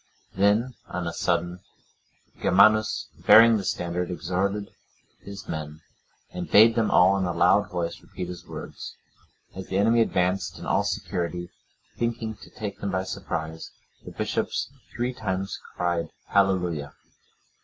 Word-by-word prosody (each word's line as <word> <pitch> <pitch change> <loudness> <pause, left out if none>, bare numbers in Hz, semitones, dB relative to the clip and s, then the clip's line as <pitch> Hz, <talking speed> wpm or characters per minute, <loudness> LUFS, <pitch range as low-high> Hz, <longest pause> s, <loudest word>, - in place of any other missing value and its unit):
Then, 105 +6 +2
on 90 -1 -4
a 85 - -3
sudden, 85 +1 -1 0.8
Germanus, 110 +3 +4 0.2
bearing 115 0 +8
the 100 - -4
standard, 90 -1 -2
exhorted 95 +3 -2 0.5
his 100 0 -10
men, 75 0 -6 0.5
and 90 -1 -6
bade 110 +2 +7
them 115 -2 +1
all 95 +2 +5
in 95 - 0
a 90 - -1
loud - - +3
voice 85 -2 -3
repeat 90 -2 -7
his 90 0 -9
words. - - -8 0.6
As 95 0 -7
the 95 - -1
enemy 115 +3 +4
advanced 90 -3 0
in - - -9
all - - +2
security, 85 0 -3 0.5
thinking 115 -1 -2
to - - -14
take 105 -2 -6
them 100 - -3
by 95 -1 -1
surprise, 80 -3 -5 0.3
the - - -9
bishops - - -2 0.2
three 125 +1 -2
times 95 -5 -3 0.2
cried, 85 -1 -1 0.2
"Hallelujah." 90 -7 +1
95 Hz, 140 wpm, -26 LUFS, 85-105 Hz, 0.8 s, bearing